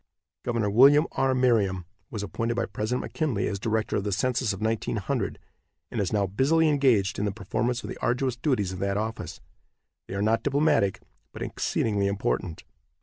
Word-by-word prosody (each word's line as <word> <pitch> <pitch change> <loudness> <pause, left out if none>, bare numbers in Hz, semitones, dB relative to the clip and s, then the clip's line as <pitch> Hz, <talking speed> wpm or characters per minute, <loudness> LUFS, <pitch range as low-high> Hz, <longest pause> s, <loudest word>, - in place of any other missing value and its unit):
Gov. 115 -4 0
William 140 +6 +7
R. 130 -1 +1
Merriam 105 -8 +2 0.2
was 105 -3 -4
appointed 115 +5 -2
by 120 - 0
President 110 +4 -2
McKinley 140 -11 -1
as 100 - -3
director 110 +1 0
of 100 - -1
the 105 - -2
census 125 +3 0
of 95 - -5
1900, 110 0 -1 0.5
and 115 - -1
is 95 - -1
now 105 -2 +2
busily 140 - +2
engaged 125 -9 +2
in 105 - 0
the 100 - 0
performance 110 +4 -2
of - - -5
the - - -6
arduous 125 0 0
duties 120 - 0
of 95 - -6
that 100 +1 0
office. 110 +1 -4 0.7
They 95 - -6
are 100 - 0
not 110 +2 +2
diplomatic, 140 -9 +2 0.3
but - - -6
exceedingly 100 -3 0
important. 100 -4 -2
110 Hz, 175 wpm, -26 LUFS, 100-125 Hz, 0.7 s, William